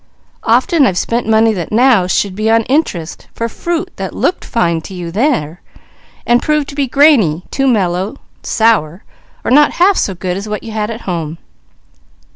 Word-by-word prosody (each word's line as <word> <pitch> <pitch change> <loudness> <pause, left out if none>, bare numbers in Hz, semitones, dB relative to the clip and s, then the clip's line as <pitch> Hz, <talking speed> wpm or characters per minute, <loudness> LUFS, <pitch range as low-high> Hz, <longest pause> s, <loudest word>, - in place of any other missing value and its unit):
Often 330 -8 +3
I've 180 - -1
spent 235 +4 -1
money 220 0 +4
that 175 -5 -5
now 230 -5 +4
should 190 +1 0
be 215 +3 -1
on 225 0 +3
interest, 210 - -2
for 230 - -2
fruit 335 +8 -3
that - - -5
looked 365 - -1
fine 170 -8 0
to 190 - -10
you 175 -2 -6
there, 185 - -1 0.6
and 240 0 +3
proved 300 -2 0
to 280 - -9
be 280 -2 0
grainy, 240 - +3
too 270 0 0
mellow, 190 -2 0 0.3
sour 205 -6 +1 0.4
or - - -2
not 295 +3 +5
half 375 +2 +3
so 190 - -1
good 180 +1 -3
as 200 +2 -6
what 210 - -4
you 225 - -7
had 215 0 -2
at 230 0 -6
home. 165 -3 -4
220 Hz, 180 wpm, -14 LUFS, 180-265 Hz, 0.6 s, not